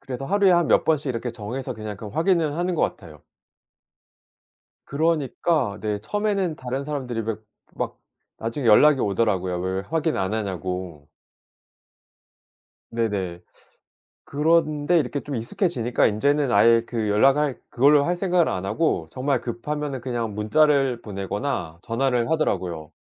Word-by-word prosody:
그래서 135 +1 -6
하루에 200 +3 +3
한 175 -2 +4
몇 - - +3
번씩 150 -3 +1
이렇게 120 0 -3
정해서 120 +4 -5
그냥 105 -2 -6
그 110 - -9
확인을 160 - +1
하는 175 +1 -1
것 - - -1
같아요. 80 -5 -4 1.6
그러니까 150 -5 0
네 105 -1 -2
처음에는 200 - -1
다른 130 +2 -4
사람들이 130 -6 -3
왜 110 0 -3 0.4
막 - - -4 0.4
나중에 115 +4 -4
연락이 135 +6 +6
오더라고요 95 -4 0
왜 95 +1 -2
왜 95 - -1
확인 160 -1 0
안 95 +3 -1
하냐고. 90 -6 -4 1.8
네네. 100 -7 -2 0.8
그런데 155 +1 +2
이렇게 140 0 -2
좀 140 +1 -5
익숙해지니까 120 - 0
인제는 140 +6 +1
아예 115 +2 +5
그 110 -3 -2
연락할 135 +6 +3
그걸로 140 +3 +4
할 175 - +1
생각을 180 -2 +2
안 95 0 -3
하고 160 +11 0
정말 135 +2 -1
급하면은 140 +3 -4
그냥 120 -4 -3
문자를 135 +2 +2
보내거나 100 - -4
전화를 125 +2 0
하더라고요. 85 - -1
125 Hz, 315 characters per minute, -24 LUFS, 105-150 Hz, 1.8 s, 연락이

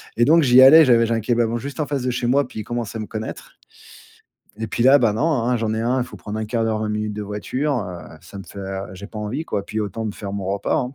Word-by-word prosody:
Et 120 - +2
donc, 160 +6 +5
j'y 130 -1 +6
allais, 155 +5 +9
j'avais 120 -3 +4
j'ai 115 - -1
un 115 - 0
kebab 115 +1 0
juste 140 +6 -7
en - - 0
face 140 -3 -2
de 125 - 0
chez 120 0 -2
moi, 135 +2 +2
puis 110 - -7
ils - - -7
commençaient 115 0 -4
à - - -4
me 105 - -6
connaître. 110 0 -7 1.0
Et 110 0 -4
puis, 115 - -1
là, 135 +3 +7
ben, 115 -4 +2
non, 115 +8 0 0.2
hein? 125 +1 +1
J'en 110 -1 -1
ai 110 - -2
un, 125 +3 +1
il - - -3
faut 110 -4 -12
prendre 105 +4 -6
1/4 110 +1 -2
d'heure, 110 -1 0
20 110 0 -2
minutes 105 0 -2
de 105 0 -5
voiture, 125 +8 -2
heu. 90 -5 -8
Ça 100 - -12
me 100 - -8
fait, 100 - -11
heu, 95 0 -5
j'ai 100 +2 -9
pas 110 - -10
envie 120 +10 -4
quoi. 100 -9 -3
Puis, 110 - -4
autant 105 +2 -4
me 105 - -2
faire 100 -1 -7
mon 100 -2 -4
repas, 100 +1 -1
hein? 125 0 -2
115 Hz, 295 wpm, -21 LUFS, 105-125 Hz, 1.0 s, allais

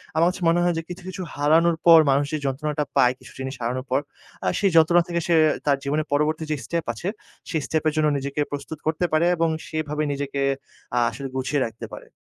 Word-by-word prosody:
আমার 165 +2 +4
কাছে 180 - -10
মনে 170 - +3
হয় 175 0 +2
যে - - -1
কিছু, 180 +1 -8
কিছু 185 0 -6
হারানোর 160 +4 +3
পর 165 -1 +9
মানুষ 140 +1 +2
যে 155 - +1
যন্ত্রণাটা 150 +2 -1
পায় 125 0 +5
কিছু - - -14
জিনিস 130 +1 -4
হারানোর 125 +3 -2
পর, 130 - +3 0.5
আ - - +1
সেই 200 -2 +2
যন্ত্রণা 170 +2 +6
থেকে 170 -1 -1
সে 170 - +3 0.3
তার 140 -2 +3
জীবনের 150 +2 -1
পরবর্তী 155 +2 +1
যে - - +2
step 170 -1 -2
আছে 145 - -6 0.4
সেই 160 -3 -1
step-এর 155 -1 0
জন্য 155 -1 +3
নিজেকে 140 +2 -3
প্রস্তুত 145 +2 -6
করতে 160 +3 +1
পারে 155 +2 +4
এবং 165 -1 +1 0.2
সেভাবে 155 -1 -2
নিজেকে 140 0 -3 0.6
আ - - +5
আসলে 140 - -6
গুছিয়ে 130 +2 0
রাখতে 115 - -7
পারে। - - -9
155 Hz, 210 wpm, -24 LUFS, 140-165 Hz, 0.6 s, পর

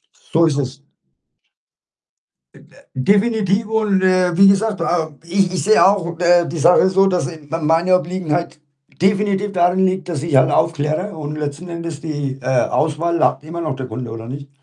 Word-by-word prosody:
So 165 +1 0
ist 145 -2 0
es. 140 +1 -5 1.7
M - - -17
äh, - - -21 0.2
definitiv. 205 - +1
Und, 215 -3 0
äh, 185 -2 +2
wie 195 0 +7
gesagt, 200 -1 +1
ähm, 160 -5 -2
ich 185 +1 0
ich - - -1
sehe 215 +1 +5
auch, 170 -4 0
äh, 175 0 +4
die 165 - -5
Sache 175 +4 +4
so, 195 +1 +3
dass, 180 -2 0
äh, 165 -2 -8
m 165 -2 -3
meine 170 +3 +3
Obliegenheit 170 -2 -3 0.4
definitiv 200 +1 +1
daran 180 +1 +2
liegt, 185 -1 -1
dass 155 -5 -3
ich 165 -4 -3
halt 130 - +4
aufkläre, 160 +4 -1
und 150 0 -6
letzten 150 +4 -5
Endes 170 -3 -6
die, 145 -4 -4
äh, 125 0 +1
Auswahl, 160 +2 -1
hat - - 0
immer 170 +2 -6
noch 155 -5 -3
der 130 -1 -6
Kunde, 120 0 -6
oder 115 0 -8
nicht? 140 +2 -8
170 Hz, 180 wpm, -18 LUFS, 150-190 Hz, 1.7 s, wie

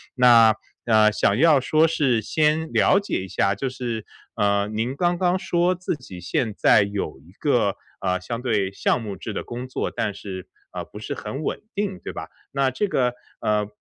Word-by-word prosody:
那， 115 -3 +7 0.3
呃， 110 -2 +5
想 100 -1 +2
要 155 -1 +5
说 155 +5 +3
是 130 -8 +1
先 155 +5 +1
了 195 - +4
解 200 - -2
一 95 - -7
下， 100 +2 +1
就 135 - -3
是， 120 -4 -4 0.3
呃， 100 0 +2
您 110 +5 -2
刚 175 +3 +1
刚 180 0 +2
说 175 0 +1
自 180 -1 -3
己 95 -11 -11
现 110 +5 -1
在 - - +5
有 100 -5 -4
一 80 +6 -19
个， 120 -9 +2 0.3
呃， 90 -1 0
相 115 +5 -4
对 105 -6 0
项 115 - 0
目 105 -3 -5
制 110 - -6
的 - - -3
工 125 +2 -6
作， 130 - -2
但 105 - -2
是， 95 -2 -8 0.3
呃， - - -5
不 105 - -11
是 - - -5
很 120 +7 -5
稳 - - -2
定， 200 -2 -2
对 - - -6
吧？ - - -6 0.2
那 140 -1 +2
这 200 +11 -1
个， 125 -8 +1 0.3
呃， 105 -1 +1
120 Hz, 210 characters per minute, -23 LUFS, 100-150 Hz, 0.3 s, 那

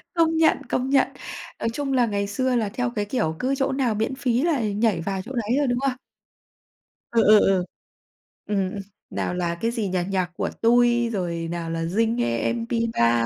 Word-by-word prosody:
Công 325 -1 +3
nhận, 320 -1 +4
công 255 +1 0
nhận. 275 0 +4 0.5
Nói - - 0
chung 275 +1 -2
là 250 -2 +4
ngày 200 -2 -1
xưa 255 +5 0
là 220 -4 +1
theo 245 +4 -2
cái 210 -1 0
kiểu 180 -8 -1
cứ 265 +2 0
chỗ 270 0 0
nào 260 -5 0
miễn 220 +5 -1
phí 250 -2 0
là 320 -6 +1
nhảy 210 -3 +1
vào 190 +2 -2
chỗ 230 +7 -10
đấy 235 +2 0
rồi, 290 -1 +2
đúng 245 0 +1
không? 275 0 +1 1.2
Ừ, 230 -1 +4
ừ, 215 0 +8
ừ. 190 -3 +3 0.8
Ừm, 195 -3 -1
ừm, - - -4 0.3
nào - - -2
là, 175 -1 -2
cái 230 - +1
gì 230 -4 -2
nhỉ, 185 - -1
NhacCuaTui, 235 +6 +2
rồi 170 -6 -2
nào 170 -1 -4
là 165 0 -2
Zing 220 +7 +1
M 120 - 0
MP3, 225 - +1
225 Hz, 195 wpm, -24 LUFS, 185-250 Hz, 1.2 s, ừ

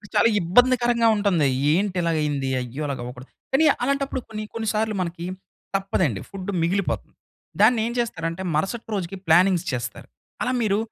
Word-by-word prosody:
చాలా 230 - +5
ఇబ్బందికరంగా 240 +5 +4
ఉంటుంది. 195 -8 +2 0.3
ఏంటి 190 +2 0
ఇలాగయ్యింది. 150 -5 0
అయ్యో! 125 +4 -6
అలాగవ్వకూడదు. 125 -1 -6 0.2
కానీ, 315 +4 +5 0.2
అలాంటప్పుడు 275 -1 -1
కొన్ని 215 -1 -5
కొన్ని 225 -1 -3
సార్లు 215 0 0
మనకి 170 -1 -4 0.5
తప్పదండి, 185 - 0
ఫుడ్డు 195 0 -5
మిగిలిపోతుంది. 185 +3 -1 0.5
దాన్నేం 225 +1 +4
చేస్తారంటే 165 -6 -2
మరుసటి 195 +10 -2
రోజుకి 195 -1 -3
ప్లానింగ్స్ 180 +1 +4
చేస్తారు. 120 -2 -5 0.3
అలా 250 - +1
మీరు 210 -2 +2
195 Hz, 130 wpm, -24 LUFS, 160-225 Hz, 0.5 s, చాలా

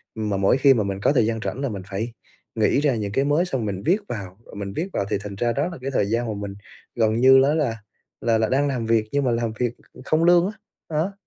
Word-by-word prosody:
Mà 105 -3 -2
mỗi 100 +6 +3
khi 135 0 +6
mà 110 - +1
mình 100 -1 -3
có - - +4
thời 120 -6 +3
gian 115 0 -1
rảnh 135 - -3
là 140 - -1
mình 100 -4 -5
phải 110 +4 -3 0.4
nghĩ 110 +5 +2
ra 140 -5 +2
những 105 -2 -3
cái 135 +6 +1
mới 150 +5 +2
xong 130 -10 -2
mình 95 -2 -3
viết 180 +5 +4
vào, 95 -4 -6
rồi - - -13
mình 100 -1 -5
viết 175 - -2
vào 100 - -1
thì 105 - +1
thành 100 -1 -6
ra 120 +3 0
đó 145 +5 0
là 170 - -7
cái 135 - -3
thời 115 - +1
gian 115 +4 -1
mà 110 - -2
mình 100 -1 -6 0.4
gần 110 -2 +2
như 130 +3 +7
nó 145 +2 +3
là 135 -8 0 0.4
là 115 -1 +2
là 110 -1 +1
đang 140 +2 +2
làm 125 -5 -2
việc 115 -1 +2
nhưng 145 0 +1
mà 125 - +2
làm 115 -1 -1
việc 120 -1 0 0.3
không 155 +2 +2
lương 175 0 +5
á. 205 - -3 0.4
Đó, 165 +5 -1
115 Hz, 275 wpm, -23 LUFS, 105-140 Hz, 0.4 s, như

